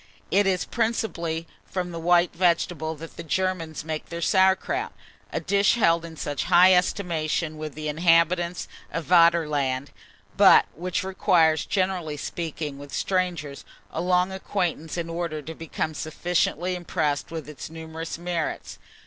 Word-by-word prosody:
It 200 +1 +4
is 185 -2 +1
principally 175 -8 -2 0.2
from 180 -2 -4
the 165 - -5
white 175 +1 +3
vegetable 170 -2 +1
that 165 +2 -11
the 170 - -6
Germans 165 -2 -2
make 155 -1 -4
their 170 - -5
sauer 190 +2 +4
kraut; 390 - -4 0.4
a - - -1
dish 200 +1 +2
held 170 -7 +3
in 165 -1 -9
such 145 -2 -3
high 185 +2 +7
estimation 170 -4 0
with 155 -1 -6
the 155 0 -5
inhabitants 170 +2 +2 0.2
of 165 0 -3
Vaderland, 150 -6 +3 0.5
but - - +7
which 180 +3 -3
requires, 175 -5 +2
generally 185 -6 -1
speaking, 150 -2 -5
with 145 -1 -10
strangers, 175 -7 -2 0.3
a - - -3
long 180 +1 +2
acquaintance 180 -4 -3
in 170 -1 -2
order 165 -2 -3
to 155 +2 -7
become 160 -1 -4
sufficiently 175 +3 -1
impressed 160 -5 -1
with 160 -3 -6
its 150 -1 -8
numerous 160 0 -6
merits. 170 -1 -4
170 Hz, 145 wpm, -25 LUFS, 155-180 Hz, 0.5 s, high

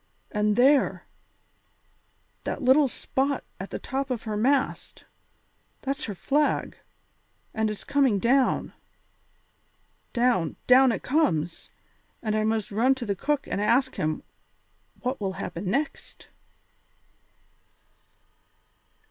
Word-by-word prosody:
And 210 -1 +1
there, 270 +4 +3 1.4
that - - -4
little 270 +3 +5
spot 270 +2 -2 0.2
at 190 - -6
the - - -4
top 270 +1 -3
of 245 -4 -3
her 215 -2 -3
mast; 265 +5 0 0.8
that's 280 +2 -2
her 205 - -5
flag, 290 +10 0 0.8
and 220 0 0
it - - -2
is 210 - -11
coming 275 -7 +2
down! 250 +5 +2 1.4
Down, 235 - +1
down 255 0 +6
it - - -3
comes, 175 - 0 0.5
and 215 -1 0
I 215 - +1
must 220 -1 -1
run 245 +6 +3
to 255 -2 -5
the 200 -2 -1
cook 290 +7 -1
and 200 - -2
ask 260 +5 +2
him 155 0 -2 0.8
what 255 -1 -3
will 195 -1 -1
happen 180 0 -5
next." 280 +9 -3
245 Hz, 115 wpm, -26 LUFS, 210-275 Hz, 1.4 s, down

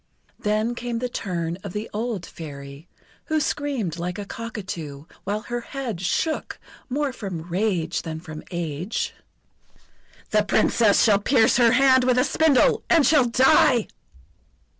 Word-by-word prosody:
Then 215 +3 0
came 240 0 -4
the 250 +2 -2
turn 175 -7 -3
of 200 -3 -7
the 210 +2 -4
old 215 -4 -3
Fairy, 140 -1 -10 0.4
who 315 -1 0
screamed 270 - -2
like 180 +1 -3
a 205 - -5
cockatoo, 180 -11 -7 0.2
while 205 +2 -2
her 240 +1 -4
head 240 -8 -5
shook 310 - -1 0.3
more 280 +1 -1
from 190 -9 -6
rage 180 -3 0
than 160 -1 -6
from 155 -2 -9
age: 170 +3 -3 1.2
"The 215 - +4
Princess 210 +1 +3
shall 205 -3 +4
pierce 225 +2 +3
her 235 -2 +5
hand 260 0 +5
with 250 0 +2
a 250 - +4
spindle, 300 -1 +3
and 330 -5 +5
shall 290 -2 +5
die!" 245 -1 +4
215 Hz, 140 wpm, -24 LUFS, 175-250 Hz, 1.2 s, her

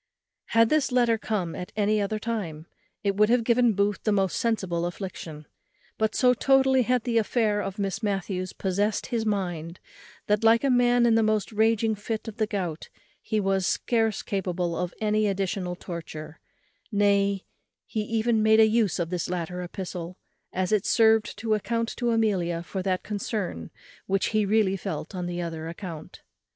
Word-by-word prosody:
Had 230 0 +3
this 305 -3 +2
letter 240 -3 +3
come 190 -7 -2
at 180 - -6
any 210 0 +2
other 205 +2 -1
time, 200 -9 -4 0.4
it 200 -1 +1
would 210 +1 +4
have 240 0 +3
given 235 0 +3
Booth 200 0 +1
the 215 - +1
most 195 -3 +1
sensible 190 -7 0
affliction; 170 -4 -7 0.5
but 220 0 +1
so 250 -1 +5
totally 265 +1 +4
had 250 0 +1
the 235 -2 +2
affair 215 -2 +1
of 195 0 -5
Miss 195 -1 -2
Matthews 195 -3 -2
possessed 205 +3 -1
his 230 -3 -2
mind, 175 -5 -2 0.5
that, 210 +1 +1
like 225 +2 +5
a 275 - +3
man 245 -1 +4
in 235 - +4
the 225 - +4
most 215 -1 +1
raging 220 0 +2
fit 215 +2 -4
of 220 - -7
the 215 -2 +1
gout, 180 -7 -4 0.3
he 215 - -1
was 195 -2 +1
scarce 225 -3 0
capable 180 -3 -2
of 180 0 -2
any 215 0 +1
additional 195 -2 -2
torture; 160 -3 -8 0.5
nay, 200 -1 +2 0.4
he 220 - -3
even 225 +1 +1
made 220 +1 +5
an 220 -1 +6
use 220 -4 +2
of 170 -1 -2
this 175 -2 -2
latter 180 0 -3
epistle, 180 -1 -6 0.3
as 185 +1 -1
it 210 -3 +3
served 220 -1 +3
to 220 -1 0
account 230 +2 -1
to 240 - 0
Amelia 190 -7 +1
for 190 +2 -4
that 185 -1 -1
concern 200 - -4 0.4
which 195 0 +1
he 215 -2 +1
really 205 -2 +3
felt 175 -3 -5
on 180 -1 -3
another 170 -2 -4
account. 170 -2 -8
205 Hz, 170 wpm, -26 LUFS, 180-225 Hz, 0.5 s, an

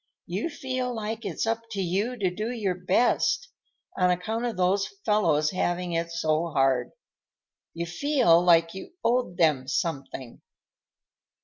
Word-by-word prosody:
You 195 - -2
feel 255 -4 -3
like 220 +1 -4
it's 190 0 -2
up 225 0 0
to 200 - -3
you 195 +7 -1
to 190 -5 0
do 215 +4 -3
your 215 -6 -1
best, 190 - +1 0.5
on 180 0 +3
account 215 +7 -1
of 235 -5 -3
those 190 +2 +2 0.2
fellows 155 -8 +2
having 180 -1 -1
it 165 0 -1
so 165 0 0
hard. 135 -5 +1 0.9
You 170 +1 -2
feel 175 - +3
like 165 -1 +4
you 190 - -9
owed 240 -7 +1
them 150 -6 +2
something." 135 - -3
180 Hz, 140 wpm, -26 LUFS, 165-225 Hz, 0.9 s, like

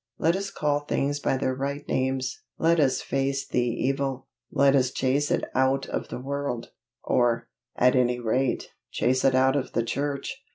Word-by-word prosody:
Let 165 +2 +2
us 195 +1 -3
call 150 -6 0
things 145 0 -1
by 135 - 0
their 130 -1 0
right 140 +2 -4
names. 130 - -1 0.2
Let 165 +1 +3
us 135 -3 +2
face 135 0 -1
the - - 0
evil. 135 +2 -1 0.3
Let 140 0 +4
us 130 -2 +3
chase 135 +3 0
it - - +1
out 130 +1 +2
of - - -3
the - - -6
world 140 -2 -4 0.3
or, 120 -1 +1 0.3
at 125 +1 +4
any 125 -1 +2
rate, 125 +2 0 0.2
chase 130 +1 +1
it 135 -1 +4
out 130 +1 +4
of 140 -2 -2
the 115 - +1
church. 140 - -3
135 Hz, 175 wpm, -26 LUFS, 130-140 Hz, 0.3 s, Let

